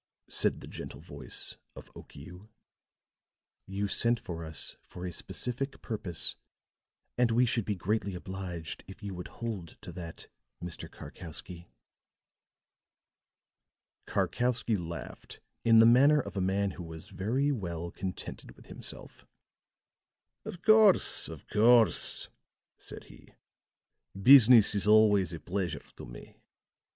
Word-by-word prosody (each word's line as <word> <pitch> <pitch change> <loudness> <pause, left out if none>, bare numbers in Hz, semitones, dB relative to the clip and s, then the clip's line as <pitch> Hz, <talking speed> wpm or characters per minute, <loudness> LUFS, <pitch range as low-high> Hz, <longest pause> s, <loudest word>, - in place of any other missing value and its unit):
said - - 0
the - - -10
gentle 70 - -8
voice 70 -4 -4 0.2
of - - -13
Okiu. 90 +8 -12 1.2
"You 100 +1 -2
sent 115 +4 +1
for 85 -1 -7
us 80 -2 0
for 90 - -9
a 90 - -4
specific 130 - -4
purpose, 100 -7 -2 0.8
and 125 -1 +4
we 120 +2 +3
should 115 -3 0
be 105 - -1
greatly 100 +1 -2
obliged 90 -3 -6
if 95 +3 -12
you 100 -1 -5
would 90 0 -7
hold 105 -9 -6
to - - -8
that, 85 -2 -9 0.3
Mr. 85 -2 -7
Karkowsky." 85 +1 -9 2.4
Karkowsky 120 -2 0
laughed 85 -3 -7 0.2
in 115 -1 +6
the 115 - +8
manner 140 +6 +6
of 100 -7 -5
a 95 - -1
man 95 +1 0
who 90 - -8
was 80 -1 -9
very 130 +9 0
well 85 - -4
contented 95 -1 -7
with - - -18
himself. - - -10 1.2
"Of 175 - -8
course, 215 -3 +5
of - - -10
course," 115 +1 +3 0.5
said - - -9
he. - - -18 0.8
"Business 120 -2 +8
is 100 0 0
always 105 -4 +5
a 85 - -6
pleasure 90 -1 -3
to - - -8
me. - - -12
100 Hz, 125 wpm, -30 LUFS, 90-115 Hz, 2.4 s, the